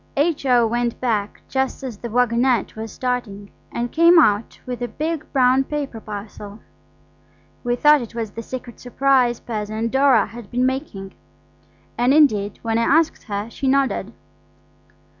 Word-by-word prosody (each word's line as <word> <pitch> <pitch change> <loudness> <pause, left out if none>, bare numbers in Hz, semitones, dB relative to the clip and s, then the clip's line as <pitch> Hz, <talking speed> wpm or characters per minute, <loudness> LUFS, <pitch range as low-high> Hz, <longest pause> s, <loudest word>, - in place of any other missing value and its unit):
H.O. 275 -6 +2
went 240 +1 -1
back 215 -5 -2
just 265 0 -2
as 240 -6 -6
the 235 - -6
waggonette 245 +1 +1
was 220 0 -6
starting, 240 -6 -4 0.2
and 240 0 -3
came 335 +2 +5
out 215 -8 +3
with 250 -1 -5
a 245 - -1
big 310 +6 -3
brown 260 0 +3
paper 280 -5 -4
parcel. 205 0 -8 1.1
We 240 -1 0
thought 295 +3 +5
it 235 -1 -9
was 225 -3 -4
the 230 - -7
secret 245 0 -8
surprise 250 -1 +1
present 220 0 -4
Dora 265 -4 +4
had 235 -3 -11
been 250 +1 0
making, 260 -8 -4 0.9
and, 250 +4 +3
indeed, 210 -10 +3
when 225 0 0
I 255 +6 +4
asked 325 -1 0
her 205 -1 -4
she 270 - -3
nodded. 275 0 +1
245 Hz, 150 wpm, -21 LUFS, 220-270 Hz, 1.1 s, came